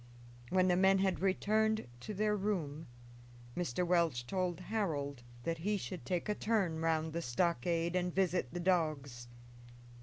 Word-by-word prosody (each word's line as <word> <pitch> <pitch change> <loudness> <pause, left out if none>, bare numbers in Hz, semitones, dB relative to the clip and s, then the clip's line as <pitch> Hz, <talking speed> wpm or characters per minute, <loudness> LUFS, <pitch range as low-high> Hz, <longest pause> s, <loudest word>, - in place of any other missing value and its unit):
When 185 0 +3
the 180 - +4
men 190 +1 +5
had 190 -1 +1
returned 215 +3 +2
to 210 - -6
their 210 +1 +2
room 170 -7 -2 0.7
Mr. 175 -1 -1
Welch 170 -9 +2
told 180 +4 -1
Harold 155 - -2 0.2
that 165 +3 -2
he 205 +5 0
should 185 -1 -6
take 180 0 -1
a 210 - +1
turn 205 -7 0
round 160 -1 +1
the 170 - -1
stockade 170 +4 0
and 180 0 +1
visit 180 -8 +1
the 175 - -4
dogs. 155 -9 0
175 Hz, 150 wpm, -34 LUFS, 160-195 Hz, 0.7 s, men